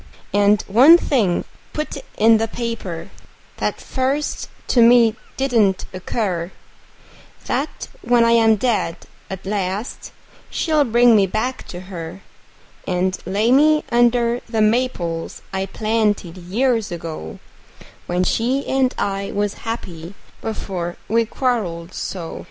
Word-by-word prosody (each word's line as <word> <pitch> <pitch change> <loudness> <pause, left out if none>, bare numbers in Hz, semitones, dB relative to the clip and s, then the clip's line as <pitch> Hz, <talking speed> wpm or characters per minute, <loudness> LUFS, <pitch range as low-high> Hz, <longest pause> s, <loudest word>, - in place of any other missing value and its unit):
And 205 +1 +4
one 265 - +7
thing 225 - +1 0.3
put 305 0 -3 0.2
in 225 +1 +6
the 225 - 0
paper, 225 -8 -5 0.5
that - - -2
first 275 +3 -2 0.2
to 245 - +4
me 230 -1 +6 0.2
didn't 225 -8 +2
occur: 185 -2 -2 0.9
That - - -3
when 240 -1 +3
I 230 - +4
am 225 -1 +5
dead 215 -7 0 0.3
at 190 0 -7
last 200 +2 -3 0.4
she'll 310 -3 +1
bring 240 0 +5
me 200 -2 +4
back 230 +7 -3
to 175 - -7
her; 180 -1 -8 0.7
And 185 0 0
lay 210 +5 +1
me 305 +3 +5
under 240 0 +3
the 225 -1 -1
maples 215 -8 -1
I 190 0 -1
planted 215 -4 0
years 220 +5 0
ago, 160 - -6 0.7
When 180 +1 0
she 250 +8 0
and 265 -1 +1
I 195 0 -2
was 205 0 -1 0.2
happy 180 -5 -6 0.3
before 185 -5 -4
we 230 +1 +2
quarreled 190 -10 -2
so. 170 -4 -5
215 Hz, 125 wpm, -20 LUFS, 185-240 Hz, 0.9 s, one